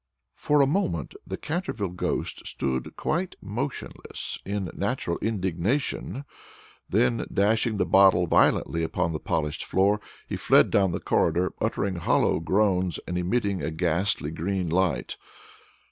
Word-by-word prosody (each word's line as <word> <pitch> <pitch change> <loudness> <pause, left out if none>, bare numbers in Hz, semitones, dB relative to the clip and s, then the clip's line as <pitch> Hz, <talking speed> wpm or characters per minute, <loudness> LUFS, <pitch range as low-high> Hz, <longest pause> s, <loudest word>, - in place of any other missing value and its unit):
For 145 -1 +2
a - - +6
moment 135 - -1
the - - -4
Canterville 155 - -3
ghost 90 +1 -3
stood 65 -2 -2
quite 175 +4 -2
motionless 120 +8 -3
in 100 -3 -3
natural 85 - -2
indignation; 110 - -1 0.6
then, 115 +3 +1
dashing 110 +2 +2
the - - +1
bottle 95 -2 +5
violently 85 0 +2
upon 85 +1 -1
the 75 - -3
polished 75 -2 -2
floor, 100 +2 +2 0.3
he - - -3
fled - - +4
down 95 -3 +3
the - - -2
corridor, 85 +3 +1
uttering 95 -3 -1
hollow 85 - +2
groans, 90 +1 +1
and 90 - -3
emitting 100 +2 0
a - - -2
ghastly 85 0 0
green 90 +2 -2
light. 90 +1 0
95 Hz, 130 wpm, -26 LUFS, 85-110 Hz, 0.6 s, a